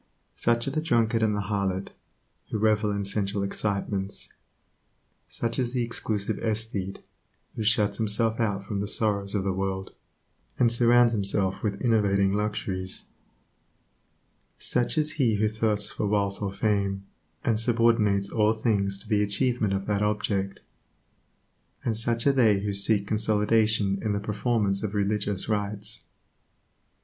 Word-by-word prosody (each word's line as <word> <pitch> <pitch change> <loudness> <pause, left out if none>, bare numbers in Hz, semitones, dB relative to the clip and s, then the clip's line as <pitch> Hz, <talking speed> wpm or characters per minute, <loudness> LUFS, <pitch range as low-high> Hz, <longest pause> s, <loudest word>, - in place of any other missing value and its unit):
Such 120 +1 +1
are - - -1
the 155 +2 -1
drunkard 115 -7 +1
and 110 -1 +2
the 105 - -1
harlot, 100 -2 -2 0.6
who - - -2
revel 105 0 +2
in 100 -1 -2
sensual 100 0 -1
excitements; 100 -1 -3 0.9
such 115 +2 -3
is 125 -1 -1
the 125 -2 0
exclusive 110 -3 -1
aesthete, 110 -3 -2 0.5
who - - -4
shuts 105 -2 +2
himself 110 +1 +2
out 100 -3 -1
from 100 -1 -3
the 100 - -2
sorrows 100 -1 0
of 100 - 0
the 95 -1 -1
world, 95 0 -3 0.6
and 120 -2 +3
surrounds 120 0 +5
himself 100 -2 0
with 100 -2 -2
enervating 100 -4 +2
luxuries; 100 -3 -3 1.5
such 125 +5 0
is 155 0 +2
he 115 -4 +3
who 105 +1 +1
thirsts 105 -1 0
for 105 - -2
wealth 100 -1 -1
or 100 -2 -2
fame, 100 -1 -1 0.4
and 110 -2 +1
subordinates 115 -4 +2
all 110 -1 +2
things 100 -3 0
to 105 - -10
the 105 -2 +2
achievement 110 +1 +1
of 100 0 -2
that 105 -1 -1
object; 105 -2 -1 1.2
and 115 - 0
such 115 +1 +1
are 140 - +6
they 110 -7 +3
who 100 0 -2
seek 100 +1 +3
consolation 105 -1 +2
in 110 -2 -1
the 100 - -1
performance 105 -1 0
of 105 -1 -4
religious 100 -1 -1
rites. 105 +1 -3
105 Hz, 145 wpm, -26 LUFS, 100-115 Hz, 1.5 s, are